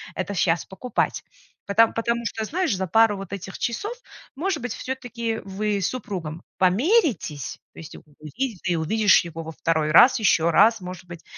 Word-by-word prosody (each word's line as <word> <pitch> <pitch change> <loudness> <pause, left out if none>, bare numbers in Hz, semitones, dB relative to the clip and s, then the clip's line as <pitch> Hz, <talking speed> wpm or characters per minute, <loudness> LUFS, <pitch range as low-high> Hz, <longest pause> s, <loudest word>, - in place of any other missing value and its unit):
это 185 +2 -3
щас 170 -2 +1
покупать. 215 +6 -2 0.4
Пото 225 +3 +5
потому 235 +1 -2
что, 220 0 -3
знаешь, 340 - -1
за 190 0 -3
пару 225 +2 +4
вот 195 -1 -8
этих 190 -1 -7
часов, 325 - -2 0.4
может 330 -1 -2
быть, 250 - -3
всё-таки, 245 -3 -4
э, - - -6
вы 200 +1 -2
с 185 - +1
супругом 180 -10 -5
помиритесь, 205 - +1
то - - -13
есть 160 - -10
увидит 175 - -6
ли, 175 - +1
увидишь 200 +4 +3
его 165 -1 -7
во 160 - -7
второй 160 -1 0
раз, 245 +10 +7
ещё 170 -6 +3
раз, 215 +5 +4
может 180 0 -8
быть, 175 -2 -11
200 Hz, 175 wpm, -24 LUFS, 170-235 Hz, 0.4 s, раз